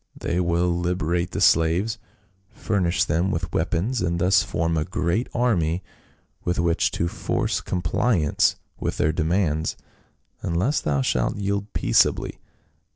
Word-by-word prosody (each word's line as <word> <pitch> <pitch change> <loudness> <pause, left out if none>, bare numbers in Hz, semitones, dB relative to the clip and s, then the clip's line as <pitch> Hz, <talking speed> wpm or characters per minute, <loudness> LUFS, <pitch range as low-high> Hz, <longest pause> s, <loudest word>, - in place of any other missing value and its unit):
They 85 - -1
will 85 0 +1
liberate 85 0 -1
the - - -4
slaves, 85 +7 +3 0.5
furnish 90 -3 0
them 90 0 0
with 80 -4 -3
weapons, 110 +9 0
and 85 -2 0
thus 95 +2 +4
form 85 -3 -1
a 80 - +1
great 90 +6 -1
army 90 -8 +1 0.6
with 90 - -1
which 85 0 +2
to 85 - 0
force - - -1
compliance 90 -1 +1 0.2
with - - -2
their 80 - +2
demands, 80 -1 0 0.6
unless 90 - 0
thou 70 -2 0
shalt - - 0
yield 100 +1 -2
peaceably." - - +2
85 Hz, 130 wpm, -24 LUFS, 80-95 Hz, 0.6 s, thus